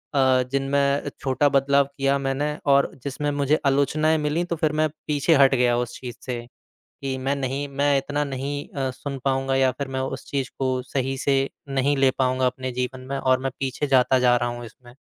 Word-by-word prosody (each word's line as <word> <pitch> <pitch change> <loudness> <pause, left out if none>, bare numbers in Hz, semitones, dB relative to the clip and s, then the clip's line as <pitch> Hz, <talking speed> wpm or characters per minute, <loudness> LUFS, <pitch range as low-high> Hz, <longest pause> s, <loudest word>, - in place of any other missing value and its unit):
अ, 130 -2 +4
जिनमें 140 +1 +1
छोटा 135 +2 +2
बदलाव 140 0 +3
किया 140 0 +2
मैंने 140 +2 -1 0.2
और 140 0 +4
जिसमें 145 +1 -2
मुझे 145 +1 +1
आलोचनाएँ 150 +3 +2
मिली। 150 +3 0
तो 175 - -2
फ़िर 155 -1 +1
मैं 155 - +2 0.2
पीछे 150 +2 +3
हट 135 -1 +5
गया 120 -1 +3
उस 120 0 -3
चीज़ 125 -2 -7
से 120 -2 -4 0.6
कि 135 -1 -2
मैं 135 +2 0
नहीं 135 +1 -2
मैं 140 +1 +1
इतना 145 +2 -2
नहीं 140 +1 -4
अ, 135 -2 -2
सुन 140 +2 -6
पाऊँगा 135 0 +1
या 135 -1 +4
फ़िर 140 +2 -5
मैं 130 0 -3
उस 130 - -4
चीज़ 135 -2 -2
को 130 -1 0
सही 135 +1 -2
से 135 +1 +2 0.3
नहीं 135 +1 +1
ले 135 -1 +4
पाऊँगा 130 0 +2
अपने 130 0 -2
जीवन 125 +1 -3
में 140 - -1
और 130 -1 +2
मैं 135 - -1
पीछे 135 +2 -2
जाता 130 -1 +4
जा 125 -1 +4
रहा 120 0 0
हूँ 120 0 -6
इसमें। 120 +2 -16
135 Hz, 205 wpm, -24 LUFS, 130-140 Hz, 0.6 s, हट